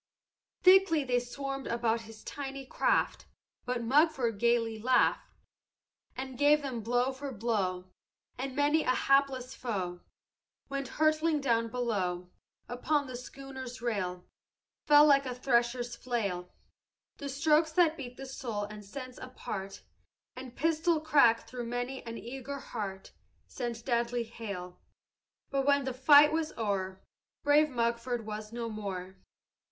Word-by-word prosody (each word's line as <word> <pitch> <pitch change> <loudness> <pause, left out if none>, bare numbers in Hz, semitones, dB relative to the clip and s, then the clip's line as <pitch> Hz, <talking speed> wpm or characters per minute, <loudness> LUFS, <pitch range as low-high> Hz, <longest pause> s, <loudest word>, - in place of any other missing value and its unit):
"Thickly 370 -5 +6
they 250 -2 +1
swarmed 275 +2 -5
about 235 -1 0
his 220 -1 -13
tiny 275 -1 -6
craft; - - 0 0.4
But 245 -1 -2
Mugford 265 -4 +2
gayly 230 -1 +2
laughed 255 +3 +2 0.9
And 260 -1 -6
gave 295 +1 +5
them 255 -4 -3
blow 245 +4 +1
for 270 +1 -6
blow; 195 -5 -2 0.4
And 260 +1 -5
many 290 +2 +3
a 255 - +1
hapless 270 -2 +2
foe 185 -7 -4 0.7
Went 275 -1 -3
hurtling 310 0 +3
down 230 -4 +1
below. 195 -7 -2 0.4
Upon 285 +4 0
the 255 -2 -7
schooner's 260 0 -8
rail 185 -6 -2 0.6
Fell, 295 0 +8
like 275 -2 +5
a 250 - -3
thresher's 240 -1 +1
flail, 200 -8 -3 0.7
The 280 - -5
strokes 310 +3 +3
that 330 -2 +4
beat 255 -5 -8
the 270 - -7
soul 240 -5 -4
and 210 0 -8
sense 255 +5 -8
apart, 195 -6 -7 0.5
And 255 -1 -9
pistol 325 +2 +2
crack 280 -8 +4
through 240 0 -6
many 245 +2 -3
an 230 0 -5
eager 265 +3 -6
heart 200 -7 -6 0.3
Sent 235 -1 -5
deadly 240 -1 0
hail. 200 -6 -7 0.7
But 275 0 0
when 285 0 +4
the 260 - -2
fight 290 +3 +7
was 320 -1 -1
o'er, 190 -4 -2 0.4
Brave 295 +1 +5
Mugford 235 -1 -1
was 215 0 -6
no 235 0 -4
more. 190 -4 -6
245 Hz, 135 wpm, -31 LUFS, 225-275 Hz, 0.9 s, Fell